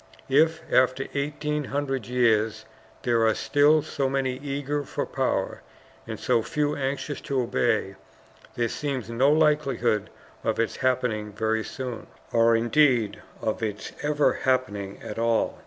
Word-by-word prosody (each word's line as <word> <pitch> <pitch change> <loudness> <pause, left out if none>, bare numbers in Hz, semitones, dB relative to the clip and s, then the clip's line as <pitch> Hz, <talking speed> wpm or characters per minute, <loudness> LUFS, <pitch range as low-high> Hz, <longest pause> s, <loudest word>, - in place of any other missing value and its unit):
If, 160 +4 +3
after 130 +1 +3
eighteen 150 +1 -2
hundred 135 -4 -2
years, 110 -3 +2 0.4
there 115 -2 +2
are 110 - +2
still 145 +7 +3
so 135 -1 -1
many 130 -1 -1
eager 145 +1 -2
for - - -3
power, - - -1 0.5
and - - -5
so 120 -2 +2
few 150 +4 -1
anxious 140 +1 -3
to 140 -3 -1
obey, 115 -4 0 0.6
there 120 -1 +1
seems 130 -3 -3
no 130 +5 +3
likelihood 150 -8 +2 0.3
of - - 0
its 115 - 0
happening 125 -5 0
very 110 +1 0
soon 125 -2 -6 0.2
or 115 0 +4
indeed 120 -1 +2 0.2
of 110 - -1
its 105 -1 -4
ever 150 0 +2
happening 105 -7 0
at 105 - -6
all. 115 -1 +1
130 Hz, 140 wpm, -26 LUFS, 115-145 Hz, 0.6 s, or